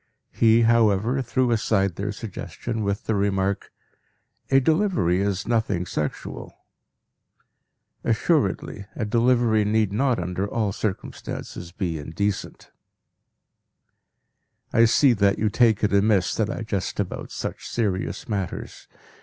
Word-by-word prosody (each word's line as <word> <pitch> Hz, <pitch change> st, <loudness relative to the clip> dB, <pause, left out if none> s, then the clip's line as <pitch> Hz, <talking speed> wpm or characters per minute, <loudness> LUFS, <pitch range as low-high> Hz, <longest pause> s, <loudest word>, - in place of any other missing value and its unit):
He, 115 Hz, +1 st, +4 dB
however, 115 Hz, +2 st, +3 dB
threw 125 Hz, 0 st, 0 dB
aside 100 Hz, -5 st, +1 dB
their 100 Hz, +2 st, -3 dB
suggestion 110 Hz, +2 st, -5 dB
with 100 Hz, +1 st, -1 dB
the 110 Hz, -, -1 dB
remark, 100 Hz, -1 st, 0 dB, 0.8 s
"a 135 Hz, -, +5 dB
delivery 135 Hz, -, +2 dB
is 100 Hz, -1 st, -1 dB
nothing 110 Hz, -6 st, 0 dB
sexual." 75 Hz, -3 st, -5 dB, 1.5 s
Assuredly, 100 Hz, -, 0 dB
a 110 Hz, -, -2 dB
delivery 115 Hz, 0 st, +3 dB
need 105 Hz, -1 st, +1 dB
not 125 Hz, +2 st, +2 dB
under 90 Hz, +3 st, -2 dB
all 110 Hz, -4 st, 0 dB
circumstances 95 Hz, -3 st, -5 dB
be 85 Hz, -4 st, -3 dB
indecent. 95 Hz, +7 st, -4 dB, 2.0 s
I 115 Hz, -, +6 dB
see 125 Hz, +3 st, +5 dB
that 100 Hz, -2 st, +2 dB
you 110 Hz, -, +1 dB
take 110 Hz, -2 st, +3 dB
it 105 Hz, -, +2 dB
amiss 100 Hz, -3 st, +3 dB
that 110 Hz, -2 st, 0 dB
I 115 Hz, -, -4 dB
jest 100 Hz, -5 st, -3 dB
about -, -, -3 dB
such -, -, -5 dB
serious 100 Hz, -5 st, -2 dB
matters. 100 Hz, -5 st, -4 dB
105 Hz, 120 wpm, -24 LUFS, 100-115 Hz, 2.0 s, I